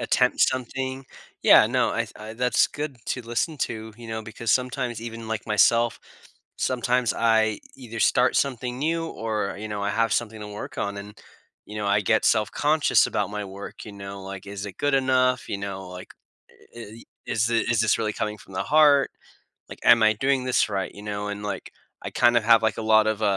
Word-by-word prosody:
attempt 125 0 +1
something. 130 +1 -1 0.4
Yeah. - - +7
No. - - +1
I - - -3
th - - -15
I 110 +1 -8
that's 125 +1 +2
good 145 -2 -6
to 125 - -3
listen 120 +7 -2
to, 110 -3 -4
you 120 -1 -11
know, 110 0 -4
because 110 0 -4
sometimes 125 -2 -1
even 115 -1 -7
like 110 -1 -4
myself, 115 +2 +3 0.6
sometimes 125 -1 0
I 110 -2 +2 0.2
either 115 -4 -8
start 125 +3 +3
something 125 -2 -1
new 165 +3 -1
or, 110 -8 -3
you 110 +1 -6
know, 105 -1 -4
I 100 - 0
have 115 +2 +1
something 110 -2 -2
to 105 - -7
work 105 0 -8
on 100 0 -2
and, 100 +1 -9 0.5
you 105 - -9
know, 105 -1 -3
I 100 +1 +3
get 110 +2 +1
self-conscious 145 +8 +3
about - - -2
my 105 0 -4
work, 100 +1 -9
you 105 - -10
know, 100 0 -8
like, 95 0 -8
"Is 100 0 -6
it 100 - -9
good 145 -1 +1
enough," 130 -2 +2
you 100 - -3
know, 95 -1 -6
like, 90 0 -10 0.4
"I 120 - -16
i 115 0 -10 0.2
is 110 0 0
this 115 -1 0
is 115 -2 +2
this 115 - +3
really 110 -2 -1
coming 105 0 -3
from 95 - -16
the - - -2
heart," 145 -2 +4 0.6
like, - - -10
"Am 115 -1 +6
I 110 0 +5
doing 135 +4 +1
this 130 -3 +2
right," 100 -2 -3
you 100 - -11
know, 105 0 -4
and, 100 0 -5
like, 100 -2 -5 0.3
I - - -5
kind 120 -1 +3
of 120 - +3
have, 115 0 +6
like, 110 -3 0
uh, - - -3
lot 110 0 +4
of 110 0 -1
110 Hz, 210 wpm, -24 LUFS, 105-125 Hz, 0.6 s, Yeah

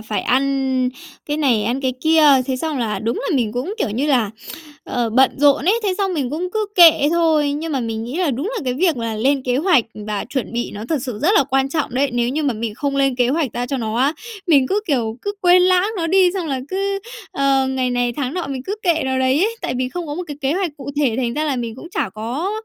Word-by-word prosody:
phải 220 -1 -3
ăn 265 -1 +1 0.4
cái 295 0 -2
này 255 -8 +2
ăn 245 +4 -1
cái 260 -1 0
kia, 320 0 +4 0.2
thế 260 -1 -1
xong 305 0 -3
là 220 -3 -1
đúng 230 +2 -2
là 285 - +2
mình 225 -4 0
cũng, 275 - -3
kiểu 215 - -1
như 260 +8 -1
là, 245 -8 +2 0.5
ờ, 235 -2 -2
bận 260 +3 +4
rộn 285 0 +4
ấy, 440 +6 +2
thế 395 -3 0
xong 385 -3 0
mình 270 -5 -2
cũng 345 +4 -3
cứ 435 -1 -1
kệ 325 -5 +7
thôi. 315 -4 +2
Nhưng 310 +2 -4
mà 265 - 0
mình 225 -1 -3
nghĩ 255 +7 -5
là 355 -5 +1
đúng 270 +9 -3
là - - -2
cái 250 -1 -1
việc 330 -1 +1
mà 230 -2 -3
lên 270 +4 +1
kế 250 -1 0
hoạch 315 - +3 0.2
và 210 -1 -3
chuẩn 265 -4 -3
bị 240 +1 -2
nó 210 +2 -7
thật 315 - +1
sự 245 -6 -5
rất 325 +8 +2
là - - +5
quan 270 0 +1
trọng 285 -4 -2
đấy, 270 +1 +1
nếu 240 0 0
như 300 +5 -1
mà 275 -4 0
mình 220 -1 -4
không 275 +2 -2
lên 270 -2 +2
kế 245 -1 +2
hoạch 285 -3 0
ra 245 0 -3
cho 275 - -2
nó 225 -2 -3
á, 275 +5 +2 0.3
mình 280 -6 +4
cứ, 410 +2 +1
kiểu, 230 -7 -1
cứ 405 - -2
quên 360 0 +5
lãng 370 +2 +3
nó 330 -2 -1
đi 370 +1 +4
xong 360 -4 -2
là 265 -3 -2
cứ, 395 +1 -1 0.3
ờ, 275 -1 +2
ngày 260 -1 -1
này 245 -1 0
tháng 270 +3 -3
nọ 355 -5 -3
mình 265 -2 -5
cứ 400 - -3
kệ 335 -4 +2
nó 260 0 0
đấy 260 +2 +2
ấy, 460 +1 -2
tại 250 - -2
vì 255 0 -1
không 345 +4 -5
có 290 - -4
một 360 - -4
cái 290 -3 -7
kế 275 0 0
hoạch 360 -1 -1
cụ 280 - -7
thể 275 -6 +1
thành 240 -2 -1
ra 305 +1 -1
là 280 -4 -1
mình 230 -2 -4
cũng 340 +6 -11
chả 195 - -2
có, 245 - -3
275 Hz, 275 wpm, -19 LUFS, 245-325 Hz, 0.5 s, kệ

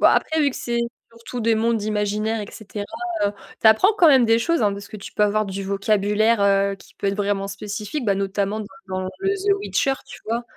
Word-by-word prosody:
bah, - - +6
après, 315 0 +1
vu 285 - +3
que - - -8
c'est 235 0 -1 0.3
surtout 230 +1 -7
des 225 0 +3
mondes 225 0 +1
imaginaires 210 +1 -1
et 205 - -5
cetera, 205 -1 -7 0.4
heu, 200 - +2 0.3
tu - - +3
apprends 220 - +6
quand 345 -5 +6
même 265 -4 +6
des 225 0 +4
choses, 335 +2 +1
hein, 205 - +3
parce 200 0 -8
que 215 - -8
tu 200 - -10
peux - - +1
avoir 210 +1 +2
du 195 0 -4
vocabulaire, 205 +2 +2
heu, 200 0 +3
qui - - -19
peut - - -4
être 195 - -1
vraiment 200 -1 -1
spécifique, 210 +6 -5
bah, 200 - +2
notamment, 200 +2 -1 0.3
dans 185 0 -2 0.2
le 390 0 -1
The 400 0 +2
Witcher. 275 -8 +1
Tu - - -10
vois? 230 +2 -1
215 Hz, 225 wpm, -22 LUFS, 200-235 Hz, 0.4 s, bah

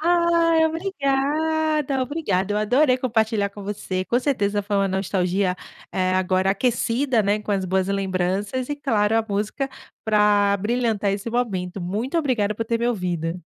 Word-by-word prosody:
Ai 335 -1 +3
obrigada, 310 -3 0
obrigada. 210 - -1
Eu - - +1
adorei 255 +5 +3
compartilhar 220 -4 +1
com 200 0 -10
você. 195 -2 -3
Com 240 - +1
certeza 205 -7 0
foi 205 0 -2
uma 195 0 +2
nostalgia, 190 -1 0 0.4
eh, 185 -1 0
agora 185 0 +2
aquecida, 240 +3 +1
né, 205 +1 +1
com 210 0 -3
as 190 -1 0
boas 190 +1 0
lembranças 195 +5 -1
e 290 - -1
claro, 220 -6 +1
a 225 - +2
música 210 +7 -2 0.4
pra 210 -2 +3
abrilhantar 210 -1 0
esse 200 +3 -4
momento. 195 -6 -2
Muito 220 - -2
obrigada 230 -9 0
por 225 - -3
ter 230 0 -1
me 235 - +1
ouvido. 180 -5 -2
210 Hz, 155 wpm, -23 LUFS, 195-265 Hz, 0.4 s, Ai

